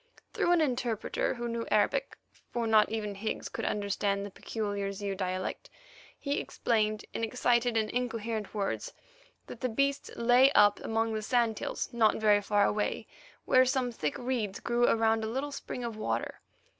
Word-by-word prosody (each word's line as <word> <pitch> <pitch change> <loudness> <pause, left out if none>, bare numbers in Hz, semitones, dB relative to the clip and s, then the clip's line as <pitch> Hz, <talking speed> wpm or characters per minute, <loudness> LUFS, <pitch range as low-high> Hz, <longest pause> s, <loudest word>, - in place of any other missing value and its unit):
Through 345 - +1
an 345 - +4
interpreter 245 -7 -1
who 240 0 -4
knew 230 0 -3
Arabic, 215 - +1 0.3
for 235 -1 -2
not 220 -1 +4
even 215 -2 -3
Higgs 210 +3 -4
could - - -4
understand 200 -1 -1
the 200 - -8
peculiar 205 -1 -3
Zeu 200 0 -4
dialect, 185 -1 -3 0.5
he 285 0 -1
explained 215 -2 -1
in - - -3
excited 240 0 +1
and 220 -1 +1
incoherent 230 -3 -3
words 200 -2 -2 0.5
that 235 - -10
the 255 - 0
beasts 275 +5 0
lay 245 +3 +5
up 205 0 +5
among 225 0 -1
the 215 - -2
sand 230 -1 +1
hills - - -3
not 225 -2 +4
very 210 -1 +4
far 205 0 +2
away, 210 +1 -1 0.4
where 255 - +6
some 255 -1 0
thick 150 -10 -3
reeds 240 -6 -2
grew 240 0 +2
around 225 0 +2
a - - -1
little 265 +6 -3
spring 250 -2 -6
of 230 -2 -4
water. 215 - -3
225 Hz, 170 wpm, -30 LUFS, 210-245 Hz, 0.5 s, where